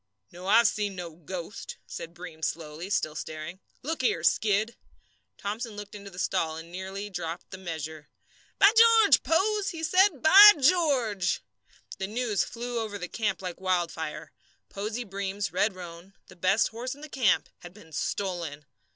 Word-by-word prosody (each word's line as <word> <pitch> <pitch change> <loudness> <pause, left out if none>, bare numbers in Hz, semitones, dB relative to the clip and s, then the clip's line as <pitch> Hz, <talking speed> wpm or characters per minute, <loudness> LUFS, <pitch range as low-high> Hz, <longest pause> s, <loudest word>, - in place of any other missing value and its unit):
"No, 180 +2 -9
I've 225 +4 +6
seen 205 -2 -2
no 175 -2 -6
ghost," 175 +5 -7
said 165 +1 -8
Breem 170 -2 -10
slowly, 160 +3 -4
still 155 -6 0
staring. 155 +3 -7 0.2
"Look 315 +2 -2
here, 170 -10 +1
Skid!" 215 +5 +2 0.6
Thomson 215 +2 -4
looked 205 0 -9
into 200 -1 -9
the 180 - -14
stall, 165 -3 -1
and 165 +1 -10
nearly 190 +3 -6
dropped 170 -2 -6
the 190 - -8
measure. 160 -4 -6 0.5
"By 400 - +7
George, 455 -2 +7
Pose!" 400 +5 +1
he 325 -2 -6
said. 365 -2 +3
"By 405 +6 +10
George!" 265 - +2 0.6
The 190 - -2
news 220 -1 0
flew 240 0 -4
over 215 -2 -4
the 180 -2 -5
camp 210 0 -2
like 180 0 -6
wildfire. 165 -4 -2 0.4
Posey 215 +4 -4
Breem's 200 -1 -4
red 210 -2 +1
roan, 175 +1 -10
the 185 - -14
best 185 +4 +2
horse 245 +4 -5
in 290 - -16
the 305 - -8
camp, 250 - +2
had 175 - -11
been 175 -4 -17
stolen! 165 -3 -3
195 Hz, 160 wpm, -27 LUFS, 175-235 Hz, 0.6 s, By